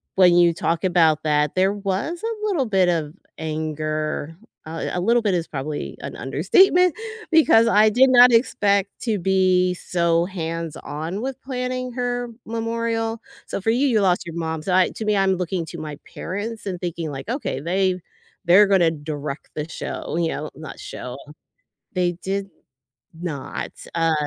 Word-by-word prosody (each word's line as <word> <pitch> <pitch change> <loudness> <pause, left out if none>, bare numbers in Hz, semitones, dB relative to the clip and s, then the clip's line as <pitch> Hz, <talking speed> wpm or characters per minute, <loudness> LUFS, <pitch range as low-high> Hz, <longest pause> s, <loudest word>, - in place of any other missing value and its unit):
when 180 -2 +6
you 175 -1 +5
talk 165 0 -1
about 165 -4 +3
that, 150 -1 +1
there 190 +2 +3
was 205 - -3
a 450 -2 -3
little 310 - 0
bit 190 -3 +3
of 160 -3 -1 0.3
anger, 155 0 -3 0.3
uh, 165 +1 -4
a 180 - -1
little 230 +5 +3
bit 205 -3 +1
is 170 -2 -1
probably 135 - -5
an - - -6
understatement, 345 - +4 0.4
because 310 -8 +6
I 215 -1 +5
did 255 +5 +5
not 245 0 +8
expect 200 -4 +2
to 220 -3 +1
be 185 0 +3
so 170 -1 +1
hands-on 165 -1 -5
with 265 +1 -5
planning 255 -1 -3
her 245 -1 -2 0.2
memorial. 230 0 -2 0.3
So, - - -3
for 225 - +2
you, 260 +5 +2
you 225 -5 +3
lost 180 -2 +2
your 170 -1 -7
mom, 160 -1 -3
so 190 - -2
I 185 -1 +4
to - - -6
me, 210 -1 +2
I'm 190 -1 +3
looking 180 -1 -2
to 170 - -8
my 150 -2 -6 0.2
parents 210 +4 -5
and 180 -2 -3
thinking 170 -3 -4
like, 135 +2 -7
"Okay, 250 - -2
they 185 +3 +1 0.5
they're 190 +4 +7
gonna 185 -4 +4
direct 150 -2 -6
the 150 0 -3
show," 165 - -5
you 170 -1 +1
know, 155 0 -4
not 155 +1 -9
show. 125 +1 -7 0.8
They 180 -1 +1
did 195 +1 -2 0.7
not. 160 -6 -5 0.2
Uh, 165 -1 +2
185 Hz, 165 wpm, -22 LUFS, 160-225 Hz, 0.8 s, not